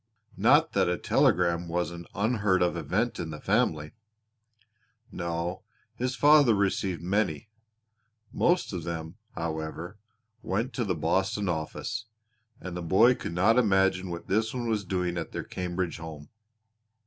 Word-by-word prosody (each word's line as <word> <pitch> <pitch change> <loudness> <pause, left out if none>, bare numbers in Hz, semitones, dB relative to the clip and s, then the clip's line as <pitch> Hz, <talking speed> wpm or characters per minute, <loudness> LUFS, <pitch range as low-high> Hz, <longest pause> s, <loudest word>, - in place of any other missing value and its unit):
Not - - +4
that - - +2
a - - 0
telegram 85 0 +2
was 85 -1 -1
an 85 0 -9
unheard 100 -3 +2
of 90 - +1
event - - -1
in - - -4
the 75 -1 -7
family. 75 -1 0 1.2
No, 85 +1 -3 0.3
his 125 +1 -2
father 145 -6 +6
received 95 -3 0
many; 95 -2 -1 0.8
most 175 - +1
of 90 -3 -4
them, 80 0 -5 0.2
however, 80 +4 -5 0.4
went 110 +8 -2
to 125 - -1
the 90 -3 0
Boston 95 +6 0
office, 90 +6 -3 0.5
and 90 -1 -7
the 90 - -4
boy 95 +9 +5
could 85 - -6
not 110 +7 +4
imagine 95 -4 +2
what 85 0 -6
this 110 +4 0
one 120 -2 -2
was 110 -3 0
doing 90 -1 -1
at - - -6
their - - -3
Cambridge 90 -1 -3
home. 80 -3 -9
90 Hz, 145 wpm, -28 LUFS, 85-105 Hz, 1.2 s, father